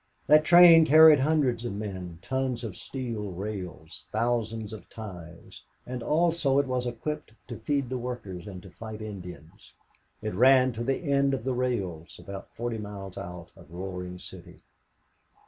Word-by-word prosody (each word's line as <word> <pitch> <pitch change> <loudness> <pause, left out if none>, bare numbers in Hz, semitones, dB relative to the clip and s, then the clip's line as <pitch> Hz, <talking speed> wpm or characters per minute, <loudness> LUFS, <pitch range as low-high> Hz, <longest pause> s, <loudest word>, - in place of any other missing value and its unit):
That 150 +1 +6
train 170 0 +8
carried 155 0 +8
hundreds 135 -5 +1
of 120 - -3
men, 95 -5 -6
tons 130 -1 -2
of 105 -6 -5
steel 115 -5 -5
rails, 90 -4 -7
thousands 115 -1 -1
of 110 - -11
ties; 90 -6 -10 0.2
and 125 0 -5
also 160 -2 +2
it 140 - +3
was 125 -1 -2
equipped 150 +2 -5 0.2
to 120 - -6
feed 140 +3 -1
the 130 +1 -3
workers 105 -8 -6
and 95 -3 -9
to 95 - -13
fight 110 +5 -8
Indians. 90 -7 -10 0.5
It - - -3
ran 130 +4 +5
to 115 0 -5
the 135 +7 -1
end 140 -2 +2
of 125 - -6
the 130 +1 -1
rails, 100 -10 -3
about 100 -1 -9
forty 115 -1 -3
miles 100 -3 -7
out 85 -1 -8
of - - -16
Roaring 90 +1 -6
City. - - -12
115 Hz, 160 wpm, -27 LUFS, 95-135 Hz, 0.5 s, train